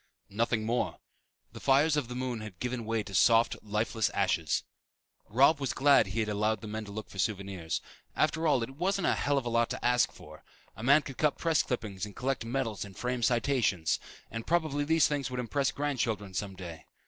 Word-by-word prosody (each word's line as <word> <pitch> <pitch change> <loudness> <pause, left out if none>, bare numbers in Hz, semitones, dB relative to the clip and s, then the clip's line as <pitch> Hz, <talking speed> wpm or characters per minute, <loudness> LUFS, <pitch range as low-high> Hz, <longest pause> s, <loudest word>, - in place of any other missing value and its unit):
Nothing 115 +1 0
more. 120 +2 -1 0.6
The - - -8
fires 145 +3 +4
of 145 -5 0
the 125 - -6
moon 125 -3 -3
had 105 -5 -9
given 125 -2 -3
way 110 -1 0
to 100 - -10
soft 115 +4 +4
lifeless 110 +1 0
ashes. - - +1 0.7
Robb 140 +7 +5
was 135 -2 -1
glad 140 -5 +5
he 110 +4 -1
had 110 - -1
allowed 105 0 0
the 110 - -7
men 110 +1 -4
to 100 - -9
look 110 +1 -6
for 95 - -11
souvenirs. 95 -5 -2 0.3
After 160 +1 +1
all, 135 -6 +3
it 115 - -5
wasn't 190 +2 0
a - - +3
hell 145 0 +1
of 135 - -1
a - - -1
lot 115 0 +2
to - - -4
ask 125 0 +3
for. - - -14 0.3
A - - -9
man 140 +5 +5
could 135 - -9
cut 150 -2 +2
press 165 -3 +2
clippings 105 -7 -4
and 105 -1 -5
collect 130 -1 -1
medals 115 -3 -2
and 100 -2 -11
frame 125 0 -2
citations; 115 - +1 0.3
and 115 0 -6
probably 155 -4 +1
these 160 -1 +4
things 145 -2 -2
would 125 0 -4
impress 135 +3 0
grandchildren 115 -9 -2
someday. 90 -4 -6
120 Hz, 205 wpm, -30 LUFS, 105-140 Hz, 0.7 s, Robb